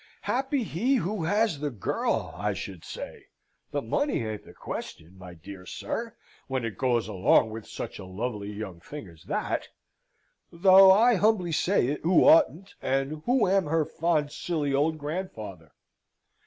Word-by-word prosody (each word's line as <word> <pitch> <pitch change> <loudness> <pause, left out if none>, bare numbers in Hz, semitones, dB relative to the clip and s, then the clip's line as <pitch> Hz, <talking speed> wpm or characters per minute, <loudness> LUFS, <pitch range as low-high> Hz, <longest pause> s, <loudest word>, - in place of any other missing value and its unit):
Happy 270 +1 0
he 230 - 0
who 205 -5 -1
has 205 -3 +1
the 145 0 -1
girl, 115 -8 -2
I 105 0 -1
should 95 -2 -7
say - - -8 0.4
the 145 - -2
money 265 - 0
ain't 110 -1 -5
the - - -14
question, 85 +4 -7
my 90 -2 -11
dear 90 +3 -11
sir, 230 -1 -5 0.3
when 130 -3 -2
it 115 - -4
goes 120 -4 +1
along 105 +2 +3
with 110 0 -8
such - - -7
a 95 - -8
lovely 105 +2 -4
young 100 -4 -7
thing 145 - -9
as 85 -2 -16
that - - -2 0.8
though 190 +2 +7
I 225 +4 +6
humbly 200 -3 +2
say 175 0 +2
it, 145 - -3
who 175 +2 +4
oughtn't, 285 - +4
and 135 +3 -1
who 245 -4 +3
am 190 0 +3
her 160 0 +1
fond 155 -3 0
silly 150 -5 -2
old 155 +3 +1
grandfather. 110 - -6
150 Hz, 160 wpm, -27 LUFS, -, 0.8 s, though